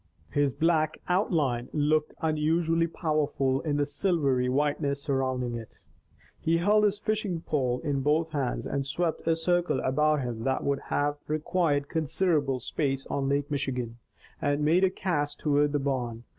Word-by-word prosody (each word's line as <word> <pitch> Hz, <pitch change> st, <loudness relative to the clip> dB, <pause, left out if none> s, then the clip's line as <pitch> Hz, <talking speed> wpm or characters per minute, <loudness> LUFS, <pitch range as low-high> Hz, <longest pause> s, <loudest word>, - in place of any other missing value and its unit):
His 145 Hz, -1 st, +2 dB
black 155 Hz, +1 st, +1 dB
outline 150 Hz, -, +1 dB
looked 150 Hz, 0 st, +1 dB
unusually 165 Hz, +2 st, +2 dB
powerful 150 Hz, -5 st, 0 dB
in 150 Hz, -2 st, -1 dB
the 145 Hz, -, +2 dB
silvery 140 Hz, -7 st, +1 dB
whiteness 140 Hz, +1 st, 0 dB
surrounding 130 Hz, -3 st, -1 dB
it. 115 Hz, -2 st, -8 dB, 0.6 s
He 165 Hz, +1 st, +2 dB
held 210 Hz, +5 st, +4 dB
his 205 Hz, 0 st, +1 dB
fishing 205 Hz, -5 st, -2 dB
pole 130 Hz, -6 st, 0 dB
in 140 Hz, -2 st, 0 dB
both 155 Hz, +3 st, +1 dB
hands 140 Hz, -5 st, -2 dB
and 140 Hz, -, -1 dB
swept 165 Hz, +5 st, -2 dB
a 165 Hz, -, +4 dB
circle 175 Hz, -3 st, +1 dB
about 150 Hz, +2 st, +2 dB
him 115 Hz, -2 st, -4 dB
that 130 Hz, +1 st, 0 dB
would 140 Hz, -1 st, 0 dB
have 145 Hz, 0 st, 0 dB
required 155 Hz, -2 st, 0 dB
considerable 155 Hz, -4 st, 0 dB
space 135 Hz, 0 st, -2 dB
on 135 Hz, -1 st, 0 dB
Lake 140 Hz, +1 st, 0 dB
Michigan, 125 Hz, -4 st, -2 dB, 0.4 s
and 145 Hz, +1 st, +1 dB
made 170 Hz, +5 st, +4 dB
a 190 Hz, -, +5 dB
cast 170 Hz, -6 st, -2 dB
toward 145 Hz, -1 st, +2 dB
the 145 Hz, -, +1 dB
barn. 125 Hz, -5 st, -2 dB
145 Hz, 155 wpm, -28 LUFS, 135-165 Hz, 0.6 s, a